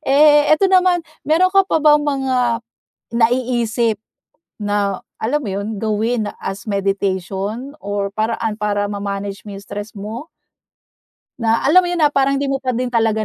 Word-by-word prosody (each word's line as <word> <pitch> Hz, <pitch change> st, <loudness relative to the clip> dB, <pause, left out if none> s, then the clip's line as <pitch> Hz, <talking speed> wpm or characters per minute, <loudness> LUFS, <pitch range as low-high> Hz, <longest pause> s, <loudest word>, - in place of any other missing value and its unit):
Eh, 295 Hz, +1 st, +5 dB
ito 310 Hz, +5 st, +4 dB
naman, 360 Hz, -2 st, +4 dB, 0.2 s
mayro'n 365 Hz, +4 st, +3 dB
ka 390 Hz, -1 st, +4 dB
pa -, -, +2 dB
bang 300 Hz, 0 st, +6 dB
mga 260 Hz, -5 st, 0 dB, 0.5 s
naiisip 235 Hz, -1 st, +1 dB, 0.6 s
na, 205 Hz, -2 st, -1 dB, 0.2 s
alam 270 Hz, +7 st, 0 dB
mo -, -, -4 dB
yon, 200 Hz, +3 st, -3 dB
gawin 220 Hz, +1 st, 0 dB
as 195 Hz, +1 st, -5 dB
meditation, 200 Hz, -, -2 dB
or 200 Hz, -1 st, -2 dB
paraan 220 Hz, 0 st, -2 dB
para 205 Hz, -1 st, 0 dB
ma-manage 200 Hz, -1 st, -4 dB
mo 205 Hz, -, -7 dB
stress 205 Hz, +1 st, -7 dB
mo? 220 Hz, +9 st, -7 dB, 1.1 s
Na 225 Hz, 0 st, +1 dB
alam 335 Hz, +7 st, +6 dB
mo -, -, -2 dB
'yon, 350 Hz, -1 st, -1 dB
na 295 Hz, -1 st, +4 dB
parang 275 Hz, 0 st, +2 dB
'di 280 Hz, -, -1 dB
mo 270 Hz, -1 st, -1 dB
pa 255 Hz, -2 st, -2 dB
din 250 Hz, 0 st, -2 dB
talaga 225 Hz, -2 st, +1 dB
230 Hz, 155 wpm, -19 LUFS, 205-275 Hz, 1.1 s, bang